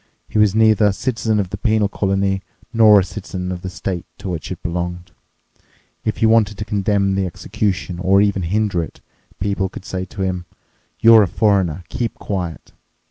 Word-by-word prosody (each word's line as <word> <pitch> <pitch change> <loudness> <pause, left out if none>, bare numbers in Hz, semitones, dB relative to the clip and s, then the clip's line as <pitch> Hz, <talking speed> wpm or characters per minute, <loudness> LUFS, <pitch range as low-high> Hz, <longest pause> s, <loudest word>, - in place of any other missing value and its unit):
He 110 - -1
was 105 -1 +4
neither 110 -1 +4
a 100 - +2
citizen 110 -1 -1
of 95 -3 -2
the 100 - -5
penal 110 -2 +2
colony 95 -1 0 0.3
nor 110 -3 +7
a - - -1
citizen 95 -1 -5
of 90 -1 -5
the 95 - -5
state 90 -1 -4
to 95 - -6
which 80 -5 -5
it - - -7
belonged. 90 0 -4 0.9
If 110 - -1
he - - +2
wanted 110 -2 +3
to 105 - -4
condemn 100 -1 +1
the 95 -1 0
execution 95 -1 -3
or 95 +1 +4
even 100 -1 +2
hinder 95 +1 0
it, 80 - -8 0.4
people 95 -1 -1
could 95 - -10
say 95 0 -4
to 95 0 -5
him: 90 -2 -3 0.5
You're 115 -1 +8
a 100 - +3
foreigner—keep 100 +4 0
quiet. 90 -6 -5
100 Hz, 180 wpm, -19 LUFS, 90-105 Hz, 0.9 s, You're